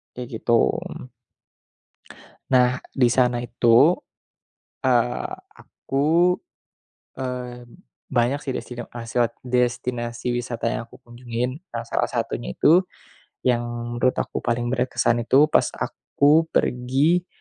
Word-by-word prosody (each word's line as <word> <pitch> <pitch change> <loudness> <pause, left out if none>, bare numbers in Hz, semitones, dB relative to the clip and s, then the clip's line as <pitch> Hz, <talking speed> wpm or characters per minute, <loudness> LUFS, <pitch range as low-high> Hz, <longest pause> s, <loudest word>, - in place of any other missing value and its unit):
kayak 125 0 -6
gitu. 120 -1 +3 1.8
Nah, 125 -1 +3
di 125 -3 +4
sana 125 -1 +2
itu, 120 +6 +5 0.9
eee, 120 -2 +1 0.2
aku, 165 +6 +1 0.8
eee, 125 -1 -5 0.4
banyak 125 +2 +2
sih 135 - -3
destino 120 -2 -6
aseo 120 0 -1 0.2
destinasi 120 -1 -1
wisata 120 -1 -3
yang 115 - -2
aku 115 - -17
kunjungin. 125 +3 -5
Nah 115 0 -4
salah - - 0
satunya - - -3
itu, 175 +5 +5 0.6
yang 120 -2 +2 0.4
menurut 130 +1 +2
aku - - -5
paling 120 +1 -1
berkesan 120 -2 +1
itu 145 +5 +5
pas - - +4
aku 150 +3 +2
pergi 140 +7 +1
125 Hz, 105 wpm, -23 LUFS, 120-130 Hz, 1.8 s, itu